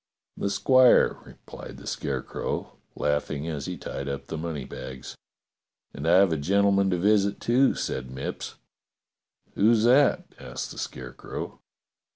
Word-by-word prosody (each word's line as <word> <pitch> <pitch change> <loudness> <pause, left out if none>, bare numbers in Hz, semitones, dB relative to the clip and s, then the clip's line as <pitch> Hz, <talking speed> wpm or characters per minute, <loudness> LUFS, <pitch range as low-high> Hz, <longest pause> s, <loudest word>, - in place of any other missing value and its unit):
"The 100 - -2
squire," 130 +4 +5
replied - - -11
the - - -12
Scarecrow, - - -4 0.2
laughing 75 +1 -1
as 75 -4 -4
he - - -4
tied 70 0 -5
up 70 0 -5
the 80 - -6
money 80 -4 -4
bags. 65 -1 -8 0.8
"And 70 +4 -5
I 85 - +6
have 95 -3 +5
a - - 0
gentleman 100 +4 +3
to 90 - +1
visit, 100 +2 +2
too," 130 +3 +3
said 65 -1 -3
Mipps. 65 +1 -6 1.0
"Who's 110 +1 +4
that.f^" 130 +4 +3
asked - - -5
the - - -8
Scarecrow. 65 0 -7
85 Hz, 140 wpm, -26 LUFS, 70-100 Hz, 1.0 s, I